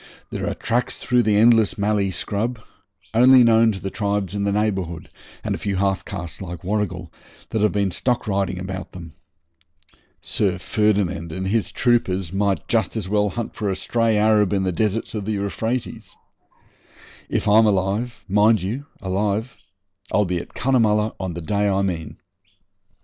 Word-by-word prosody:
There -, -, -2 dB
are -, -, -3 dB
tracks 120 Hz, +3 st, -1 dB
through 125 Hz, -1 st, +2 dB
the 110 Hz, -3 st, +2 dB
endless 115 Hz, -1 st, +4 dB
mallee 100 Hz, -1 st, +1 dB
scrub, 110 Hz, +6 st, -2 dB, 0.5 s
only 125 Hz, +2 st, +7 dB
known 115 Hz, -1 st, +5 dB
to 95 Hz, -, -5 dB
the 95 Hz, -, -5 dB
tribes 100 Hz, -2 st, -1 dB
in 100 Hz, -1 st, -1 dB
the 100 Hz, -, +1 dB
neighbourhood, 95 Hz, -5 st, -2 dB, 0.3 s
and -, -, -1 dB
a -, -, -4 dB
few 100 Hz, -1 st, -2 dB
half 95 Hz, 0 st, 0 dB
castes 85 Hz, -4 st, -6 dB
like 90 Hz, -3 st, -7 dB
Warrigal, 95 Hz, -4 st, -2 dB, 0.4 s
that 110 Hz, -, 0 dB
have 105 Hz, -, +3 dB
been 100 Hz, -2 st, 0 dB
stock 120 Hz, +7 st, -1 dB
riding 95 Hz, -2 st, -1 dB
about 95 Hz, 0 st, -6 dB
them. 85 Hz, -4 st, -10 dB, 1.1 s
Sir 95 Hz, -3 st, 0 dB
Ferdinand 95 Hz, -4 st, 0 dB
and 95 Hz, +4 st, -4 dB
his 110 Hz, +1 st, 0 dB
troopers 95 Hz, -8 st, +1 dB
might 100 Hz, -3 st, 0 dB
just -, -, 0 dB
as -, -, -3 dB
well 105 Hz, 0 st, +2 dB
hunt 115 Hz, +3 st, -5 dB
for 105 Hz, -, -2 dB
a 95 Hz, -, -1 dB
stray 115 Hz, +2 st, +1 dB
Arab 105 Hz, -2 st, +3 dB
in 95 Hz, -1 st, +1 dB
the 95 Hz, -, 0 dB
deserts 110 Hz, +4 st, -1 dB
of 105 Hz, -3 st, -4 dB
the 110 Hz, -, -1 dB
Euphrates. 110 Hz, +5 st, -3 dB, 1.1 s
If -, -, -1 dB
I'm 110 Hz, +2 st, +6 dB
alive 105 Hz, +3 st, -1 dB
mind 105 Hz, +3 st, +4 dB
you, 125 Hz, +9 st, -4 dB, 0.2 s
alive 100 Hz, +5 st, -1 dB, 0.6 s
I'll 105 Hz, -, +3 dB
be 90 Hz, -1 st, -1 dB
at -, -, -11 dB
Cunnamulla 110 Hz, -5 st, +2 dB
on 95 Hz, -3 st, -4 dB
the 85 Hz, -, -5 dB
day 100 Hz, +4 st, 0 dB
I 100 Hz, 0 st, +1 dB
mean. 85 Hz, -4 st, -3 dB
105 Hz, 170 wpm, -22 LUFS, 95-110 Hz, 1.1 s, only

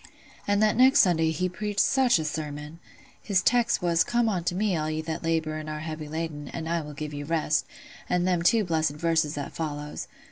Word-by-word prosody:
An' 205 Hz, 0 st, +2 dB
that 215 Hz, -1 st, +3 dB
next 260 Hz, +2 st, +7 dB
Sunday 165 Hz, -3 st, +3 dB
he 160 Hz, +3 st, 0 dB
preached 205 Hz, +2 st, -4 dB
such 265 Hz, -5 st, +4 dB
a 160 Hz, -, -2 dB
sermon! 150 Hz, +1 st, -5 dB, 0.4 s
His 195 Hz, -3 st, +1 dB
text 240 Hz, -4 st, +2 dB
was, 170 Hz, -1 st, +3 dB
'Come 240 Hz, -1 st, +1 dB
unto 175 Hz, -3 st, -1 dB
me 200 Hz, -1 st, +1 dB
all 155 Hz, -1 st, -1 dB
ye 155 Hz, 0 st, -2 dB
that 160 Hz, +1 st, -4 dB
labour 160 Hz, -2 st, -1 dB
and 155 Hz, 0 st, -6 dB
are 155 Hz, 0 st, -5 dB
heavy 155 Hz, -1 st, -6 dB
laden, 155 Hz, -2 st, -4 dB
and 160 Hz, +2 st, -6 dB
I 170 Hz, 0 st, 0 dB
will 150 Hz, -1 st, -8 dB
give 150 Hz, 0 st, -5 dB
you 145 Hz, 0 st, -5 dB
rest,' 155 Hz, -1 st, 0 dB, 0.4 s
and 180 Hz, 0 st, +1 dB
them 180 Hz, -2 st, +1 dB
two 215 Hz, +6 st, +4 dB
blessed 160 Hz, -4 st, 0 dB
verses 160 Hz, -1 st, 0 dB
that 145 Hz, -1 st, -5 dB
follows. 150 Hz, -2 st, -5 dB
165 Hz, 210 wpm, -26 LUFS, 155-185 Hz, 0.4 s, next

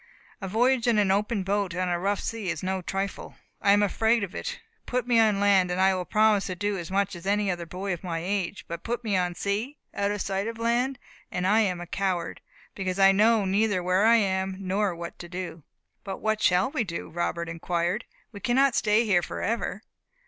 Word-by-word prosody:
A 190 Hz, -, -4 dB
voyage 240 Hz, +4 st, +2 dB
in 235 Hz, -2 st, +3 dB
an 200 Hz, -2 st, +3 dB
open 205 Hz, +1 st, 0 dB
boat 195 Hz, -2 st, -1 dB
upon 185 Hz, 0 st, -1 dB
a 175 Hz, -1 st, 0 dB
rough 200 Hz, +2 st, 0 dB
sea 220 Hz, -5 st, -3 dB
is 170 Hz, -1 st, -3 dB
no 190 Hz, 0 st, -1 dB
trifle. 195 Hz, +2 st, -4 dB, 0.3 s
I 200 Hz, -, +4 dB
am 205 Hz, +1 st, +5 dB
afraid 225 Hz, +3 st, +2 dB
of 190 Hz, -, -5 dB
it. -, -, -5 dB, 0.3 s
Put 250 Hz, 0 st, -1 dB
me 240 Hz, -2 st, +3 dB
on 215 Hz, -3 st, +4 dB
land, 195 Hz, -3 st, +4 dB
and 180 Hz, +1 st, -1 dB
I 190 Hz, 0 st, +4 dB
will 185 Hz, -1 st, -3 dB
promise 215 Hz, -1 st, +3 dB
to 185 Hz, -, -3 dB
do 205 Hz, +2 st, -1 dB
as 175 Hz, -3 st, -5 dB
much 195 Hz, 0 st, 0 dB
as 175 Hz, +2 st, -9 dB
any 205 Hz, -1 st, +2 dB
other 175 Hz, -1 st, -5 dB
boy 190 Hz, +3 st, -3 dB
of 175 Hz, -, -7 dB
my 170 Hz, -3 st, -3 dB
age; 190 Hz, +2 st, -3 dB
but 170 Hz, 0 st, -5 dB
put 240 Hz, +1 st, -3 dB
me 210 Hz, -4 st, 0 dB
on 180 Hz, -1 st, 0 dB
sea, 210 Hz, -, -2 dB, 0.2 s
out 200 Hz, 0 st, 0 dB
of 205 Hz, 0 st, -2 dB
sight 195 Hz, +2 st, -2 dB
of 230 Hz, 0 st, -5 dB
land, 240 Hz, +3 st, 0 dB, 0.3 s
and 180 Hz, -, -2 dB
I 210 Hz, +4 st, +4 dB
am 185 Hz, -5 st, +1 dB
a 175 Hz, -, -6 dB
coward, 180 Hz, -1 st, -2 dB, 0.3 s
because 185 Hz, -1 st, -3 dB
I 195 Hz, 0 st, +7 dB
know 215 Hz, +1 st, +4 dB
neither 200 Hz, -1 st, +1 dB
where 185 Hz, +2 st, +2 dB
I 230 Hz, -, +7 dB
am, 190 Hz, -3 st, +1 dB
nor 195 Hz, 0 st, 0 dB
what 170 Hz, 0 st, -8 dB
to 175 Hz, -, -9 dB
do." 180 Hz, -2 st, -6 dB, 0.4 s
"But 195 Hz, -1 st, -5 dB
what 215 Hz, 0 st, 0 dB
shall 185 Hz, +6 st, +3 dB
we 295 Hz, -6 st, 0 dB
do?" 170 Hz, -5 st, -5 dB
Robert 170 Hz, 0 st, -2 dB
inquired; 170 Hz, +5 st, -2 dB, 0.3 s
"we 205 Hz, -, -9 dB
cannot 260 Hz, +3 st, +3 dB
stay 215 Hz, +1 st, +3 dB
here 185 Hz, -5 st, +3 dB
for -, -, -5 dB
ever." 215 Hz, -1 st, -2 dB
195 Hz, 225 wpm, -26 LUFS, 180-215 Hz, 0.4 s, I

